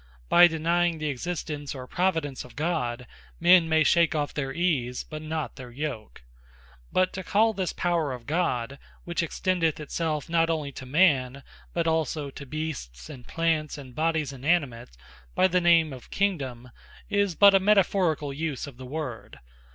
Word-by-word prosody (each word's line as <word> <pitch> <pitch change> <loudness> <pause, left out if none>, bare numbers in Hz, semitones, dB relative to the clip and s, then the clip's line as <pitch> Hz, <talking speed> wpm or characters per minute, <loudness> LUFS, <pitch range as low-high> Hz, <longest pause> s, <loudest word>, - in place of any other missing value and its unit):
By 175 0 +8
denying 170 +1 +1
the 155 -1 -2
Existence, 145 0 -4
or 130 -1 -7
Providence 160 -4 -1
of 125 - -15
God, 145 -7 -2 0.3
men 175 -1 +6
may 160 -1 +4
shake 170 0 +3
off 145 -1 -1
their 135 -2 -3
Ease, 135 -7 -1
but 155 -1 -8
not 155 -2 -4
their 125 -2 -9
Yoke. 120 - -6 0.7
But 185 0 +2
to 190 - -5
call 220 +5 +2
this 190 -4 -2
Power 170 -5 0
of 125 -2 -7
God, 140 -5 -1 0.2
which 170 0 -2
extendeth 170 -1 0
it 150 - -9
selfe 155 -3 -2
not 165 0 +2
onely 155 -3 -2
to 130 -1 -9
Man, 140 -4 +2 0.3
but 170 -1 -1
also 160 -3 -1
to 140 - -9
Beasts, 125 - -6
and 125 -2 -12
Plants, 160 -3 -1
and 130 -3 -10
Bodies 155 -1 0
inanimate, 130 - -1 0.4
by 185 - +5
the 180 0 +1
name 165 -3 +4
of 125 - -11
Kingdome, 135 -11 -2 0.4
is 200 -4 +1
but 200 +2 +7
a 195 - +6
metaphoricall 185 -7 +2
use 155 -3 -3
of 140 -4 -11
the 130 0 -9
word. 135 -4 -6
155 Hz, 165 wpm, -26 LUFS, 135-170 Hz, 0.7 s, By